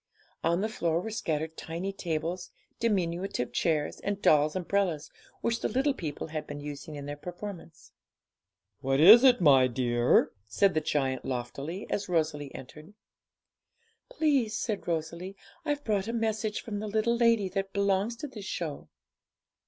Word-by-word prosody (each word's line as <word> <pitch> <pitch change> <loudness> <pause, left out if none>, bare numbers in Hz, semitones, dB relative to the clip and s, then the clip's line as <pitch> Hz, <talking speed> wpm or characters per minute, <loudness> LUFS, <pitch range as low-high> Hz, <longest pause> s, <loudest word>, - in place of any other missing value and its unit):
On 170 +2 +2
the 215 - +1
floor 170 -6 0
were 220 +5 -5
scattered 160 -6 -2
tiny 170 +6 -4
tables, 170 -1 -3 0.3
diminutive 185 - -1
chairs, 155 -3 0
and 200 0 -2
dolls' 150 -4 +4
umbrellas, 185 -4 -1 0.3
which 230 0 0
the - - +1
little 270 +3 +1
people 155 - -5
had 155 -1 -4
been 145 0 -6
using 145 +2 -7
in 145 -1 -7
their 145 0 -5
performance. 175 +1 -9 0.9
'What 135 0 0
is 215 - +10
it, 255 -2 +6
my 135 -5 +6
dear?' 120 -1 +2 0.2
said 190 - +3
the 155 - +1
giant 135 -4 -1
loftily, 140 +8 -4
as 200 - -2
Rosalie 155 -4 -1
entered. 155 +9 -11 1.1
'Please,' 280 - +1
said 215 -4 -3
Rosalie, 170 +3 -3 0.3
'I've 290 -1 -1
brought 205 -4 0
a 230 - -2
message 220 -2 -1
from 205 -3 -5
the 215 - -4
little 220 +3 +1
lady 230 -4 +3
that 195 +1 -3
belongs 200 +3 +1
to 265 +6 -6
this 215 -7 -9
show.' 155 - -5
180 Hz, 150 wpm, -29 LUFS, 150-215 Hz, 1.1 s, is